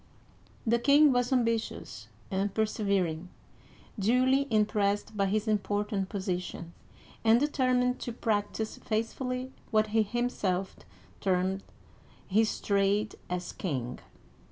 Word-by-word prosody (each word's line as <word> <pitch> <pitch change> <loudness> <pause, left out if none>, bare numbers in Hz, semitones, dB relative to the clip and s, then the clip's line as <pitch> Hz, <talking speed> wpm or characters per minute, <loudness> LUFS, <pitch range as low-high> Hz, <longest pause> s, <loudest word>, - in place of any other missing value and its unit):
*' - - -29
The 235 +1 +3
king 285 +4 +6
was 245 +1 +1
ambitious 230 -3 -1 0.2
and 195 +1 0
persevering, 195 -6 0 0.7
duly 255 +6 +3
im 215 -1 +4
pressed 205 0 0
by 200 -1 +2
his 215 +3 0
important 205 -1 0
position, 180 -4 -4 0.5
and 225 +1 +6
determined 255 -3 +1
to 240 - -4
practice 220 -1 -2
faithfully 250 +4 -2 0.2
what 215 -1 +2
he 225 - +5
himself 205 -4 -1 0.4
termed 190 0 +1 0.4
" - - -30 0.3
his 215 +3 +2
trade 200 +1 +1 0.2
as 180 0 -3
king." 130 -8 -3
215 Hz, 115 wpm, -29 LUFS, 195-240 Hz, 0.7 s, king